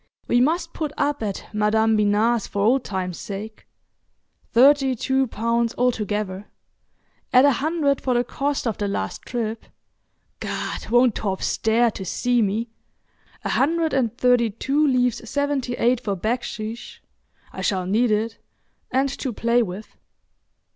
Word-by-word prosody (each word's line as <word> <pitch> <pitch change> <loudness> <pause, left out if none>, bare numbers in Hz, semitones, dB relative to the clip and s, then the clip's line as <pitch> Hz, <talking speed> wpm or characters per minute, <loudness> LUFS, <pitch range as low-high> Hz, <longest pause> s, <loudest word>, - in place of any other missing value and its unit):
We 240 - +3
must 330 +5 0
put 305 -3 -3
up 290 -1 0
at 205 -3 -4
Madam 220 +1 +2
Binat's 210 +2 +2
for 200 - -2
old 250 +4 +3
time's 185 -3 -4
sake. 215 +2 -7 0.8
Thirty 270 +2 +5
two 265 +3 +1
pounds 230 +1 -1
altogether. 210 -5 -1 0.8
Add 255 +2 +6
a 285 - +6
hundred 285 +1 0
for 255 -2 0
the 240 - +3
cost 280 +3 -2
of 225 -4 -2
the 205 - 0
last 95 - -3
trip—Gad, 225 -2 -6
won't 245 0 +4
Torp 195 -2 -3
stare 225 +1 +2
to 195 - -7
see 245 +6 +1
me!—a 225 +3 -6
hundred 325 +3 +1
and 240 -3 0
thirty 245 -2 +3
two 275 +8 0
leaves 250 -3 +1
seventy 285 -3 -1
eight 245 +1 +2
for 205 -5 -2
baksheesh—I 225 +2 -6
shall 190 -3 0
need 225 +6 +2
it—and 230 +4 -3
to 260 - -2
play 235 +2 +2
with. 205 0 -6
235 Hz, 135 wpm, -23 LUFS, 215-260 Hz, 0.8 s, Add